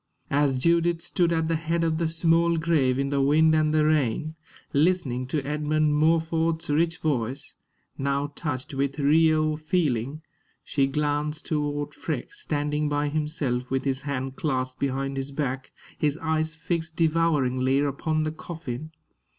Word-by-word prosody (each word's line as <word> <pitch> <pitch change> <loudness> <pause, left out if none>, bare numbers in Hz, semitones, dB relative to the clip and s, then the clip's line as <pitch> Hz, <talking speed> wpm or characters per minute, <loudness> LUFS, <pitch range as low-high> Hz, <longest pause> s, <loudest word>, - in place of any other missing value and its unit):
As 140 -2 +2
Judith 170 +4 +2
stood 170 0 0
at 160 -1 +1
the 165 - +1
head 165 +1 -1
of 160 -1 0
the 165 - +1
small 165 +1 +2
grave 155 -6 +2
in 140 0 0
the 140 -1 +1
wind 155 +3 +4
and 155 -1 +3
the 155 0 +3
rain, 155 0 +1 0.4
listening 140 -5 +1
to 140 +1 -2
Edmund 150 +1 +1
Morford's 160 +1 +1
rich 165 +2 +2
voice, 135 -4 -2 0.5
now 140 +1 -1
touched 140 -4 -4
with 140 +1 -1
real 155 +1 +3
feeling, 150 -3 -1 0.4
she 135 -2 +1
glanced 150 +2 -1
toward 145 -1 -2
Freke, - - -4
standing 150 - -1
by 145 0 0
himself, 145 -5 -2
with 135 +1 -1
his 135 -1 0
hands 135 -2 -3
clasped 130 -6 -2
behind 135 0 -1
his 135 +1 -3
back, 135 -2 -3 0.3
his 150 -1 +1
eyes 160 0 -1
fixed 165 0 -3
devouringly 145 -6 +2
upon 145 +2 0
the 155 - -1
coffin. 155 -3 -6
150 Hz, 150 wpm, -26 LUFS, 140-160 Hz, 0.5 s, wind